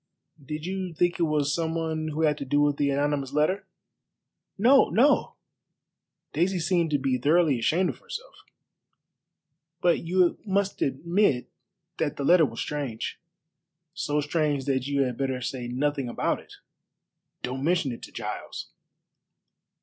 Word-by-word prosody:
Did 150 +3 -5
you 185 -2 -4
think 175 +1 +1
it 165 -2 +2
was 145 -2 +1
some 165 -1 -1
one 160 -1 -2
who 155 +1 -2
had 150 -1 +3
to - - -3
do 145 +2 +1
with 145 -1 +2
the 145 -1 +1
anonymous 140 -1 0
letter?" 185 +7 +1 0.9
"No, 255 +7 +6
no!" 275 +6 +3 1.0
Daisy 185 +2 +1
seemed 170 -1 +1
to 145 - +2
be 130 -2 0
thoroughly 150 -1 +3
ashamed 175 +10 +2
of - - -15
herself. - - -8 1.5
"But 175 -1 +3
you 175 +1 +2
must 200 -1 -1
admit 160 0 +1 0.5
that 150 -3 -1
the 140 - -3
letter 165 0 +6
was 115 -1 -8
strange." 135 -7 -4 0.7
"So 150 -5 -1
strange 150 -2 0
that 135 -2 0
you 140 -1 +2
had 125 -2 -3
better 135 -2 -1
say 125 -1 -4
nothing 135 +1 -1
about - - 0
it. - - -15 0.9
Don't 130 +2 -3
mention 170 -4 +1
it 115 - -7
to - - -10
Giles." - - -6
150 Hz, 150 wpm, -26 LUFS, 135-175 Hz, 1.5 s, No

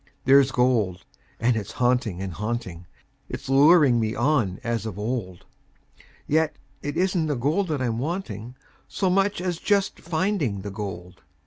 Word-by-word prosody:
There's 135 0 +6
gold, 115 -8 +1 0.3
and 120 +1 +2
it's 110 0 -4
haunting 120 -7 0
and 95 -2 -5
haunting; 105 -5 -4 0.4
It's 135 - -6
luring 140 -2 +6
me 110 -1 -1
on 120 -7 +1
as 115 -2 -2
of 105 -4 -6
old; 105 -5 -4 0.8
Yet 160 +1 +1 0.3
it 145 +2 -4
isn't 180 -3 +1
the 145 - 0
gold 150 +11 0
that 150 -5 -1
I'm 115 -2 -1
wanting 125 - -4 0.3
So 190 -2 0
much 195 +1 +2
as 180 -2 -2
just 200 -1 +1
finding 165 - -1
the 100 +1 -6
gold. 95 -4 -7
125 Hz, 150 wpm, -25 LUFS, 105-155 Hz, 0.8 s, There's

